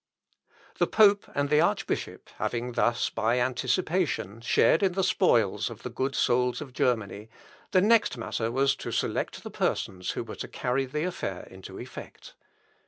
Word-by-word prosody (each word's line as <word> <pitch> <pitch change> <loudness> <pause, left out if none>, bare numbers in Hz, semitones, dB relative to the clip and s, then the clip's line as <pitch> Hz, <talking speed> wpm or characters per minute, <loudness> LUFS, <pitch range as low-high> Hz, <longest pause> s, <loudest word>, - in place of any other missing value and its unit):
The - - +3
pope 205 -2 +4
and 145 0 0
the 150 +1 +5
archbishop 170 - -1
having 120 +1 -2
thus, 120 0 +1
by 115 +3 +1
anticipation, 130 - -1
shared 140 +6 +3
in 190 -2 +2
the 190 +1 0
spoils 115 - +2
of 115 - -11
the 125 - -5
good 130 +3 -2
souls 125 0 +2
of 140 -4 -8
Germany, 110 -4 -1 0.4
the 185 - +4
next 220 - +3
matter 115 0 -2
was 135 +2 +2
to - - -6
select - - -2
the - - -7
persons 90 -1 -2
who - - -3
were - - -9
to - - -5
carry 130 +2 -1
the 150 +4 -2
affair 165 - -4
into 95 0 -10
effect. - - -10
125 Hz, 165 wpm, -27 LUFS, 115-155 Hz, 0.4 s, the